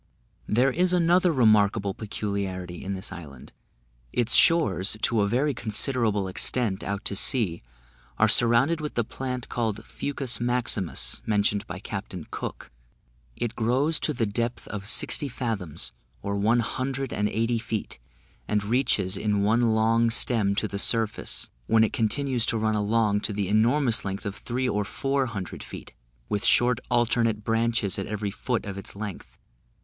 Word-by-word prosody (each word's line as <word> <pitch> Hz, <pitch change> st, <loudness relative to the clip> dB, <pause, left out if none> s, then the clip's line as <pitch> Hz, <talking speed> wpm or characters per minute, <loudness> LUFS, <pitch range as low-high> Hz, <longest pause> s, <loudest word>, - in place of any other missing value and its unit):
There 125 Hz, +5 st, +3 dB
is 180 Hz, +5 st, +1 dB
another 175 Hz, +1 st, +4 dB
remarkable 110 Hz, -6 st, +3 dB
peculiarity 100 Hz, -4 st, -4 dB
in 100 Hz, +1 st, -3 dB
this 95 Hz, +2 st, -4 dB
island: 75 Hz, -8 st, -10 dB, 0.6 s
its 120 Hz, -1 st, +3 dB
shores, 110 Hz, -, +4 dB
to 115 Hz, -2 st, +2 dB
a 100 Hz, -, +2 dB
very 135 Hz, +7 st, +1 dB
considerable 110 Hz, -3 st, +1 dB
extent 100 Hz, +2 st, +1 dB
out 100 Hz, 0 st, -4 dB
to 100 Hz, -, 0 dB
sea, 105 Hz, -, +2 dB, 0.6 s
are 110 Hz, -, +4 dB
surrounded 120 Hz, +8 st, +4 dB
with 150 Hz, -, -5 dB
the 120 Hz, -, +1 dB
plant, 125 Hz, +2 st, -5 dB
called 110 Hz, -3 st, -3 dB
fucus 135 Hz, -3 st, -3 dB
maximus, 120 Hz, -6 st, 0 dB
mentioned 105 Hz, -1 st, +1 dB
by 90 Hz, -, -6 dB
Captain 95 Hz, -3 st, -6 dB
Cook; -, -, -6 dB, 0.6 s
it 120 Hz, -1 st, -3 dB
grows 130 Hz, +8 st, +1 dB
to -, -, 0 dB
the 120 Hz, -5 st, 0 dB
depth 115 Hz, +3 st, -2 dB
of 105 Hz, -1 st, -5 dB
sixty 145 Hz, +6 st, +2 dB
fathoms, 110 Hz, -, -4 dB, 0.3 s
or 100 Hz, -, -2 dB
one 110 Hz, +4 st, +2 dB
hundred 135 Hz, +2 st, -3 dB
and 105 Hz, 0 st, 0 dB
eighty 115 Hz, +1 st, 0 dB
feet, 110 Hz, -2 st, -5 dB, 0.5 s
and 105 Hz, -1 st, 0 dB
reaches 105 Hz, -4 st, +1 dB
in 105 Hz, -2 st, 0 dB
one 115 Hz, +2 st, +3 dB
long 115 Hz, +1 st, +3 dB
stem 110 Hz, -4 st, +2 dB
to 105 Hz, -, 0 dB
the 100 Hz, -1 st, -4 dB
surface, 110 Hz, 0 st, 0 dB, 0.2 s
when 110 Hz, 0 st, +4 dB
it 110 Hz, -, 0 dB
continues 125 Hz, +1 st, 0 dB
to 115 Hz, -, +1 dB
run 110 Hz, 0 st, 0 dB
along 105 Hz, 0 st, +1 dB
to 105 Hz, 0 st, -2 dB
the 100 Hz, -2 st, -2 dB
enormous 115 Hz, +3 st, +2 dB
length 100 Hz, +2 st, -5 dB
of 100 Hz, 0 st, -4 dB
three 125 Hz, +4 st, -3 dB
or 105 Hz, -4 st, 0 dB
four 135 Hz, +6 st, -1 dB
hundred 100 Hz, -6 st, -6 dB
feet, -, -, -10 dB, 0.3 s
with 105 Hz, -, -2 dB
short 120 Hz, 0 st, +4 dB
alternate 115 Hz, -3 st, +1 dB
branches 115 Hz, -3 st, +1 dB
at 95 Hz, -, -4 dB
every 105 Hz, -1 st, -3 dB
foot 115 Hz, +3 st, -2 dB
of 100 Hz, -1 st, -5 dB
its 100 Hz, -, -10 dB
length. 100 Hz, -2 st, -7 dB
110 Hz, 160 wpm, -26 LUFS, 100-120 Hz, 0.6 s, another